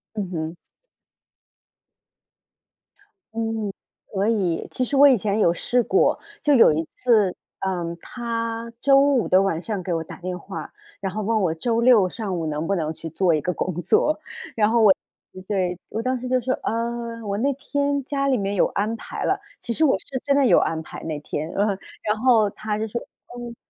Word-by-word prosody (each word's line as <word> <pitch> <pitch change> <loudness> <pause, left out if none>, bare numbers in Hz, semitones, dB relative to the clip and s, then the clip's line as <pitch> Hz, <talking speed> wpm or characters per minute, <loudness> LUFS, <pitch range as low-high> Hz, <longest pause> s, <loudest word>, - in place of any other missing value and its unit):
嗯 200 -4 -3
哼。 160 0 -3 2.8
嗯， 225 -3 -2 0.4
可 195 +1 +1
以。 190 -7 0
其 255 - -1
实 280 - -2
我 285 +1 +8
以 260 - +5
前 205 +1 -1
有 170 - +5
试 245 +7 +1
过， 390 - +2 0.2
就 295 - +4
有 240 - +7
一 155 +2 0
次， 215 -7 +2 0.3
呃， 175 -3 -2
他 230 0 -4
周 275 +1 +5
5 280 -4 +3
的 185 - +5
晚 195 -5 0
上 200 +1 -4
给 180 - -4
我 165 -1 0
打 - - -10
电 180 0 -4
话， 190 +3 -7 0.3
然 195 -1 -3
后 215 +3 -3
问 220 +1 +1
我 180 -4 +2
周 230 +7 0
6 235 -6 +6
上 195 -2 -4
午 165 - -2
能 155 0 -2
不 200 - +1
能 160 -3 -2
去 165 - -8
做 170 +2 +2
一 155 - +1
个 180 - -1
工 180 -1 -3
作。 305 - +2 0.4
然 210 -1 +3
后 230 0 +3
我 200 -3 +8 0.5
对， 185 -4 -1
我 220 - -4
当 255 0 0
时 250 - -4
就 255 0 +3
说， 260 +2 0
呃， 230 0 -3
我 200 -1 -2
那 275 +5 +2
天 285 +1 -1
家 275 -1 -1
里 265 -2 +3
面 200 0 -1
有 200 - +3
安 210 +3 -1
排 225 - -6
了， - - +1 0.2
其 235 - -4
实 320 - +1
我 285 - +4
是 265 -2 -6
真 280 - +2
的 280 -1 +4
有 - - +6
安 160 - 0
排 - - -9
那 155 -2 -3
天。 155 +2 -4
然 200 - +2
后 205 - +1 0.3
然 210 +1 0
后 230 -3 +5
他 215 0 -3
就 220 +1 -2
说 235 +3 -4 0.3
嗯， 240 -1 -7
215 Hz, 210 characters per minute, -23 LUFS, 185-240 Hz, 2.8 s, 我